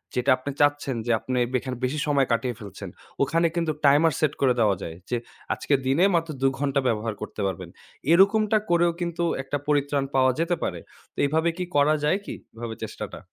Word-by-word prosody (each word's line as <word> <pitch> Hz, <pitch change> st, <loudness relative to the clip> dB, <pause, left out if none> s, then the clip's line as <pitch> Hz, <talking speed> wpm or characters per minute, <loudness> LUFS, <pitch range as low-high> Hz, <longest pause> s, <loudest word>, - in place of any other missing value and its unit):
যেটা 125 Hz, +2 st, 0 dB
আপনি 135 Hz, +2 st, -5 dB
চাচ্ছেন 145 Hz, -2 st, +2 dB
যে 120 Hz, -, 0 dB
আপনে 130 Hz, +2 st, -2 dB
বে 130 Hz, -, -2 dB
এখানে 130 Hz, 0 st, -5 dB
বেশি 150 Hz, +4 st, -2 dB
সময় 140 Hz, -3 st, +2 dB
কাটিয়ে 120 Hz, 0 st, 0 dB
ফেলছেন। 100 Hz, -3 st, -8 dB, 0.3 s
ওখানে 165 Hz, +4 st, +2 dB
কিন্তু 165 Hz, -2 st, 0 dB
টাইমার 150 Hz, +3 st, +5 dB
সেট 150 Hz, -2 st, +1 dB
করে 130 Hz, -2 st, +4 dB
দেওয়া 105 Hz, -4 st, +3 dB
যায়। 80 Hz, -, -6 dB
যে 120 Hz, -, 0 dB, 0.4 s
আজকে 145 Hz, -, -2 dB
দিনে 140 Hz, +8 st, +3 dB
মাত্র 165 Hz, -1 st, 0 dB
২ 135 Hz, -, +4 dB
ঘন্টা 140 Hz, -1 st, +1 dB
ব্যবহার 110 Hz, -1 st, -1 dB
করতে 105 Hz, -, -6 dB
পারবেন। 95 Hz, -, -5 dB, 0.4 s
এরকমটা 210 Hz, +4 st, +5 dB
করেও 175 Hz, 0 st, +3 dB
কিন্তু 170 Hz, 0 st, -2 dB, 0.2 s
একটা 145 Hz, +2 st, -2 dB
পরিত্রাণ 145 Hz, -1 st, +1 dB
পাওয়া 130 Hz, -1 st, +4 dB
যেতে 170 Hz, +1 st, +1 dB
পারে। -, -, -2 dB, 0.3 s
তো -, -, -45 dB
এভাবে 160 Hz, +3 st, +1 dB
কি 180 Hz, -, -2 dB
করা 145 Hz, +2 st, +4 dB
যায় 185 Hz, +7 st, +2 dB
কি? -, -, -5 dB, 0.2 s
এভাবে 115 Hz, -1 st, -6 dB
চেষ্টাটা? -, -, -6 dB
145 Hz, 195 wpm, -25 LUFS, 125-165 Hz, 0.4 s, টাইমার